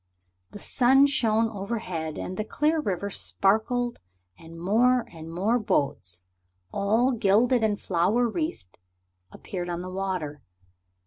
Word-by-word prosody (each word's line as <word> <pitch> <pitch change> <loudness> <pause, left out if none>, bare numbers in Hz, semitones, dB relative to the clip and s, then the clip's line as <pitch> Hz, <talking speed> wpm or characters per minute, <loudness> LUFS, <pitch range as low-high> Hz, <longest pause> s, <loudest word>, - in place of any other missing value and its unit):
The - - -10
sun 265 +6 +4
shone 230 -6 +2
overhead 195 -7 -4
and 185 - -5
the 215 - -2
clear 300 +8 +1
river 200 - -2
sparkled 230 +7 0 0.4
and 165 - -12
more 235 +7 +3
and 165 0 -9
more 205 +8 +1
boats, 90 - -1 0.5
all 220 +6 +2
gilded 235 +2 +3
and 210 -2 +1
flower 200 +7 +1
wreathed, 230 - -4 0.5
appeared 180 -2 -6
on 175 0 -3
the 185 - -6
water. 185 -6 -3
205 Hz, 125 wpm, -26 LUFS, 175-240 Hz, 0.5 s, sun